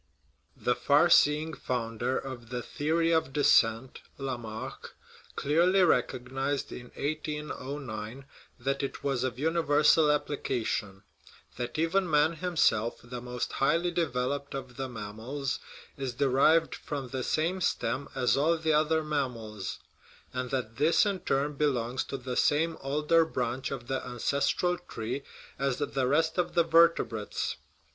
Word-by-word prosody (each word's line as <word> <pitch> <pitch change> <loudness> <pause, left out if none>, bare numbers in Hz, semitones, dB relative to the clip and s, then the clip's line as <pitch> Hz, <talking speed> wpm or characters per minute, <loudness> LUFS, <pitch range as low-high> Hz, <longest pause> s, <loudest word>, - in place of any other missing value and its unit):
The - - +1
far - - +3
seeing 150 +2 +4
founder 120 -1 -2
of 120 -4 -7
the 125 -1 -4
theory 165 +5 0
of 160 -5 +1
descent, 120 -4 +3 0.2
Lamarck, 125 -2 -6 0.4
clearly 175 +6 +3
recognized 135 -1 0
in 125 - -8
1809 140 -5 -4 0.3
that 135 +3 -1
it 140 - -5
was 135 -3 0
of 130 -1 -2
uni 160 +4 +1
versal 150 +1 +5
application; 115 -9 -2 0.5
that 120 +2 -4
even 175 +3 +1
man 150 +2 +4
himself, 155 -10 +1
the 120 0 -7
most 125 0 -4
highly 170 +6 +1
developed 140 -4 -1
of 130 -2 -7
the 135 +1 -4
mammals, 115 +5 -4 0.4
is 130 -3 -4
derived 140 +5 +3
from 140 -4 -5
the 130 0 -3
same 165 +8 0
stem 140 -4 -1
as 125 -2 +2
all 160 +4 +3
the 160 -1 +1
other 155 +1 +2
mammals; 120 -9 -3 0.6
and 125 0 -3
that 120 -4 -3
this 160 +7 +4
in 200 -2 0
its - - -21
turn 140 +2 +1
belongs 130 -4 0
to 135 - -4
the 125 -1 -5
same 160 +5 +2
older 150 +4 +3
branch 125 -4 -2
of 130 -3 -5
the 130 +1 -1
ances 135 +3 0
tral 180 0 +1
tree 115 +5 -4 0.4
as 135 -2 0
the 135 -3 -1
rest 160 +5 +2
of 175 0 -1
the 170 - +5
vertebrates. 165 -10 +2
135 Hz, 140 wpm, -29 LUFS, 125-155 Hz, 0.6 s, versal